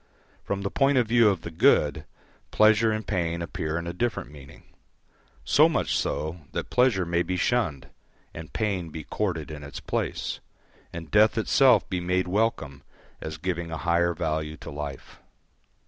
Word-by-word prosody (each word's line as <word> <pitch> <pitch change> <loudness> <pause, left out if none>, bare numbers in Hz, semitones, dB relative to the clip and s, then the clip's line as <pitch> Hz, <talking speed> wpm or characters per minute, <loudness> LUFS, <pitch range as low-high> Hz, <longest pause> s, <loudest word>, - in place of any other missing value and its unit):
From 100 0 -3
the 100 - -2
point 135 0 +2
of 125 - +4
view 115 -1 +5
of 95 -5 -1
the 85 - -7
good, 75 -1 +3 0.4
pleasure 110 +1 +4
and 110 0 -3
pain 85 -4 -1
appear 80 -1 -3
in 85 - -4
a 85 - -4
different 115 -5 -2
meaning; 70 -2 -14 0.8
so - - +5
much - - 0
so, 80 +4 -2
that - - -4
pleasure 125 -8 +3
may 85 0 +1
be 90 +1 -2
shunned, 90 - 0 0.5
and 80 0 -9
pain 100 -6 -2
be 80 0 -7
courted 85 -7 -3
in 75 -1 -8
its 70 - -8
place, - - -3 0.5
and 85 -1 -8
death 105 +2 +4
itself 130 +4 +4
be 90 - -2
made 90 +1 0
welcome 90 -9 -1 0.4
as 80 0 -6
giving 85 0 -3
a 80 - -4
higher 85 +1 +1
value 80 -1 -2
to - - -9
life. 75 -1 -7
85 Hz, 165 wpm, -26 LUFS, 80-105 Hz, 0.8 s, view